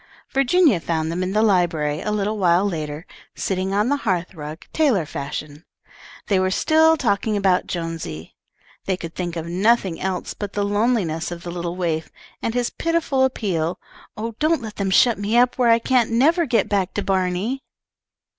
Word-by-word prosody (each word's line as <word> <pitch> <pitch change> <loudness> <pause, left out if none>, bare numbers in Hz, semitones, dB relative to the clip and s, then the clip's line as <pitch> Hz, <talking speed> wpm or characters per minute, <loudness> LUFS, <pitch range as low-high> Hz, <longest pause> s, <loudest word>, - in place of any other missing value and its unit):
Virginia 275 - +3
found 160 -1 -2
them 175 +2 -2
in 185 0 -1
the 215 +2 +2
library, 165 -7 +1
a - - -3
little 210 0 -1
while 180 +1 +3
later, 155 -2 -4 0.3
sitting 190 0 -2
on 205 +3 +1
the 285 +2 +1
hearth 185 -8 -2
rug, 155 0 -8
tailor 260 - +2
fashion. 145 +2 -6 0.6
They 195 -3 +2
were 185 0 +1
still 320 +10 +4
talking 215 -4 0
about 190 -2 +2
Jonesy. 165 - -5 0.5
They 190 -2 0
could 165 -2 -7
think 175 -2 -4
of 165 -1 -4
nothing 190 0 +1
else 190 -2 -3
but 205 -1 -6
the 205 -1 0
loneliness 205 -6 0
of 175 -1 -7
the 175 - -5
little 170 0 -4
waif, 165 -3 -2 0.3
and 230 - -2
his 245 -1 0
pitiful 330 -5 0
appeal: 180 -9 -1 0.4
"Oh, 225 +2 -4
don't 310 -3 +1
let 215 -2 -8
them 200 -1 -1
shut 230 +3 +4
me 210 +3 +1
up 250 +1 +3
where 245 -2 +4
I 230 - +6
can't 240 0 +2
never 310 +9 +3
get 230 -5 +2
back 195 -3 -1
to 205 - -1
Barney." 190 +6 -1
195 Hz, 180 wpm, -22 LUFS, 170-235 Hz, 0.6 s, I